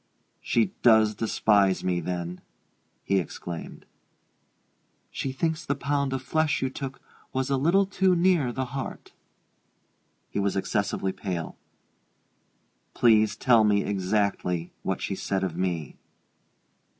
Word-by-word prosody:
"She 110 -5 +1
does 110 -2 +5
despise 100 -3 +2
me, 90 -1 0
then?" 90 0 -4 0.6
he 100 0 +2
exclaimed. 85 0 -7 1.3
"She 135 - -3
thinks 160 +4 -1
the 140 - -1
pound 140 -1 -1
of 135 -1 -3
flesh 155 +2 +1
you 130 - -1
took 135 0 -6 0.3
was 130 +1 -1
a - - +3
little 170 +9 +3
too 190 -1 +2
near 170 -7 +3
the 130 +2 -2
heart." 135 -1 -6 1.2
He - - -2
was 100 -1 0
excessively 100 0 -1
pale. 90 -4 -4 1.4
"Please 110 -3 +4
tell 120 -4 +4
me 105 -1 +3
exactly 95 -3 -1
what 95 - -2
she - - -2
said 95 0 -2
of 90 -4 -2
me." 85 -5 -3
110 Hz, 125 wpm, -26 LUFS, 95-135 Hz, 1.4 s, does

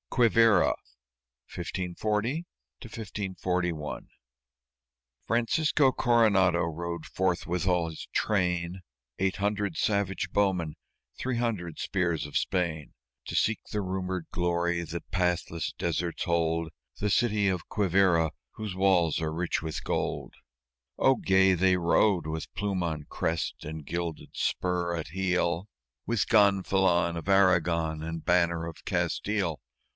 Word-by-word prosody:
QUIVÍRA 115 -2 +4 0.8
[1540 105 - -2 0.4
1541] 95 - -3 1.2
Francisco 135 +4 +2
Coronado 100 -9 +3
rode 85 0 -4
forth 90 -2 -1
with 90 +1 -1
all 90 -3 +2
his 80 - -8
train, 90 -3 0 0.4
Eight 95 0 0
hundred 100 -3 -1
savage 100 -2 0
bowmen, 90 -6 +1 0.4
three 130 -2 -2
hundred 105 -9 -2
spears 85 -5 0
of 75 - -10
Spain, 85 -5 -1 0.3
To - - -4
seek 110 - +2
the 105 - -1
rumored 95 -2 -3
glory 85 0 0
that 85 +1 -7
pathless 90 -3 -1
deserts 85 0 -2
hold 85 -1 0 0.3
The 105 0 0
city 105 -1 +2
of 90 -3 -2
Quivíra 95 -5 +3 0.2
whose 105 -4 -5
walls 90 -4 +3
are 80 -1 -1
rich 85 +2 -1
with 80 0 -4
gold. - - -2 0.6
Oh, 135 - +4
gay 95 -3 +4
they 90 +1 +3
rode 85 0 +3
with 80 0 -5
plume 100 -3 -1
on 80 -3 -2
crest 80 0 -2
and 75 -1 -7
gilded 85 0 -4
spur 90 -1 -1
at 80 -3 -5
heel, 90 +1 0 0.4
With 115 -3 0
gonfalon 95 -4 +3
of 85 +4 -5
Aragon 85 -5 +3
and 80 0 -5
banner 85 -2 +2
of 85 -1 -9
Castile! 100 -7 -1
90 Hz, 120 wpm, -28 LUFS, 85-100 Hz, 1.2 s, QUIVÍRA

